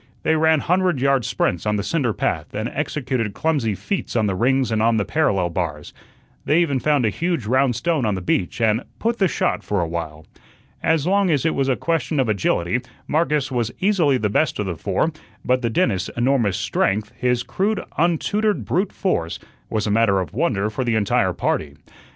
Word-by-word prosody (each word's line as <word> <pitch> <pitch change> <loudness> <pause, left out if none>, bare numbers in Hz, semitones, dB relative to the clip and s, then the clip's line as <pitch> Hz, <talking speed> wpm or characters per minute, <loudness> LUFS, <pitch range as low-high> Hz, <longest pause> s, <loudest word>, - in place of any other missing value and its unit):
They 160 - +2
ran 160 -1 +3
hundred 180 -4 +1
yard 135 -2 +2
sprints 90 +4 -1
on 105 - +1
the 100 - -1
cinder 135 -2 0
path - - -2
and - - -2
executed 125 -7 -2
clumsy 140 -10 0
feats 195 - -4
on 110 -2 +2
the 100 - 0
rings 130 +5 +1
and 110 -1 +1
on 115 0 +3
the 100 - 0
parallel 95 - +1
bars. 80 -4 -4 0.5
They 155 - +3
even 145 -6 +1
found 145 -3 +2
a 110 - +2
huge 170 - -2
round 130 +2 +2
stone 160 +2 0
on 105 -3 +1
the - - -3
beach 90 +2 -1
and 110 0 +2 0.2
"put 235 +1 -1
the 195 - +4
shot" - - -1
for 105 - -1
a 85 - 0
while. 80 -2 -5 0.6
As 160 -2 +1
long 195 +1 +2
as 150 -2 +1
it 160 - +2
was 135 -1 0
a 130 - +3
question 165 -1 -1
of 130 - +2
agility, 100 +1 0 0.3
Marcus 150 -3 +1
was 120 -2 -1
easily 180 -9 +3
the 110 - 0
best 125 +8 +1
of 105 - -2
the 90 -3 -3
four; 100 - 0 0.3
but 125 0 +2
the 120 - 0
dentist's 100 -4 0
enormous 120 -6 +2
strength, 105 +1 0
his 125 -1 0
crude, 210 +3 -1 0.2
untutored 205 +6 +1
brute 185 +3 0
force, 85 - -1 0.3
was 110 -2 -1
a 105 - 0
matter 105 -3 +3
of 95 0 -4
wonder 110 -7 0
for 130 +5 -2
the 120 -2 0
entire 105 -2 +2
party. 70 -2 -2
125 Hz, 200 wpm, -21 LUFS, 105-160 Hz, 0.6 s, the